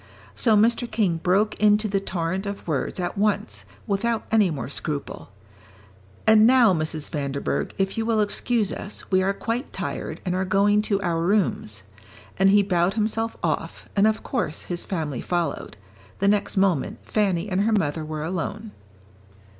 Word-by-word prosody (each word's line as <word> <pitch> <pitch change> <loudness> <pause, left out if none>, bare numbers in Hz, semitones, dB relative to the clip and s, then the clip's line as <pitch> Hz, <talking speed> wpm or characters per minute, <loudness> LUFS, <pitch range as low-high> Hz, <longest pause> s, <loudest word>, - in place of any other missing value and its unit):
So 220 -3 +3
Mr. 235 +3 +2
King 205 -6 +1
broke 195 +5 +2
into 210 +1 +4
the 200 -1 0
torrent 185 +1 -3
of 200 -2 -6
words 150 +2 -2
at 180 +2 -3
once, 115 - 0 0.2
without 225 +3 -1
any 215 -4 +4
more 150 -4 -4
scruple. 140 -3 -5 1.0
"And 220 0 +7
now, 245 -5 +6
Mrs. 155 -2 -3
Vanderburgh, 140 -2 -2
if 195 +2 -1
you - - +1
will 225 -2 +2
excuse 210 0 0
us, 205 - -8
we 185 0 +4
are 190 +1 +2
quite 230 +6 -3
tired, - - -4
and 180 - 0
are 185 +1 0
going 200 +2 +3
to 200 -2 +2
our 170 -2 0
rooms." 170 - 0 0.6
And 195 0 +5
he 205 +1 +5
bowed 180 -1 +1
himself 225 +1 -1
off, - - -2
and 205 +1 +5
of 220 0 0
course 215 - -3
his 175 -1 -4
family 155 -9 -3
followed; 175 -10 -2 0.4
the 200 - +1
next 205 0 +1
moment 190 -7 +1
Fanny 195 -4 0
and 190 -1 0
her 220 +2 +2
mother 160 -6 0
were 155 0 -4
alone. 190 +6 -4
195 Hz, 165 wpm, -24 LUFS, 170-215 Hz, 1.0 s, And